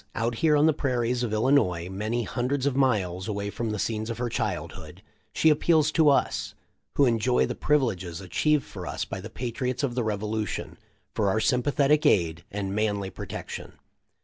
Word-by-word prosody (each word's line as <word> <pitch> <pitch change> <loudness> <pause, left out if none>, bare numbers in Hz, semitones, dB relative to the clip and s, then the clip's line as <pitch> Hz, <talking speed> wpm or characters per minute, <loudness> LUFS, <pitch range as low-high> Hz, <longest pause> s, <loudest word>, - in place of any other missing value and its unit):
Out 115 +1 0
here 155 -2 +4
on 145 - +4
the 160 - +4
prairies 125 -4 0
of 120 -3 -1
Illinois, 110 -7 +2
many 105 +5 -2
hundreds 130 +4 -1
of 140 -2 +1
miles 100 -9 +1
away 100 -1 -3
from 115 +1 -3
the 105 - -2
scenes 110 +1 -2
of 115 - -4
her 120 0 -2
childhood, - - -4 0.3
she 160 - +4
appeals 155 0 +3
to 155 -2 +4
us, 140 - +1 0.4
who 140 - +5
enjoy 120 +1 +2
the - - -3
privileges 100 - 0
achieved 140 - +1
for - - -8
us - - -3
by - - -6
the - - -8
patriots 125 +2 -3
of 130 -4 0
the 125 -1 -1
Revolution, 110 0 -3 0.3
for 100 -2 +1
our 110 - +1
sympathetic 140 +4 +2
aid 85 -3 +2
and 100 -1 -3
manly 100 -2 -1
protection. - - -7
115 Hz, 175 wpm, -26 LUFS, 105-140 Hz, 0.4 s, who